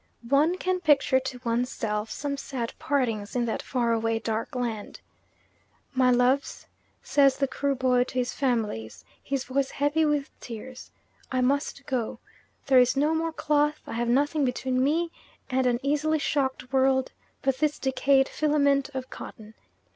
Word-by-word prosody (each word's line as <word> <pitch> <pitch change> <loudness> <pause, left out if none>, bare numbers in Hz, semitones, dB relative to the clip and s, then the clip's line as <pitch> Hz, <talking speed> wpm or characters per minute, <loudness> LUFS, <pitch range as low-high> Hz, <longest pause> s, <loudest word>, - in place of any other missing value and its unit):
One 300 +6 +3
can 370 0 -1
picture 285 -5 +4
to 260 -1 -6
one's 240 +2 0
self 210 -2 -2
some 285 -1 -3
sad 255 -4 -4
partings 235 -7 -1
in 245 -1 +1
that 225 - -2
far 240 -3 0
away 225 0 0
dark 225 +2 -3
land. 230 -4 -4 0.9
"My 255 -1 +3
loves," 250 +3 +2 0.4
says 275 -2 +4
the 275 - +1
Kruboy 255 -2 +1
to - - -9
his 250 -1 0
families, 220 - -2 0.2
his 275 -2 -2
voice 270 +1 -1
heavy 290 +3 +1
with 295 -2 0
tears, 245 +2 -9 0.4
"I 255 -1 +1
must 280 +1 0
go. 245 -5 -2 0.5
There 265 -3 +6
is 250 +2 +3
no 300 +3 +3
more 325 0 0
cloth, 300 -1 +1
I - - -7
have 235 +1 -1
nothing 290 +4 +2
between 255 0 0
me 330 +4 +1 0.4
and 260 0 +2
an 240 -1 +1
easily 300 +2 +1
shocked 270 -3 -1
world 265 0 +3 0.3
but 265 -1 +1
this 300 -1 +1
decayed 270 +1 +2
filament 285 -2 +2
of 260 -1 -5
cotton." 215 -1 -10
265 Hz, 155 wpm, -27 LUFS, 245-285 Hz, 0.9 s, There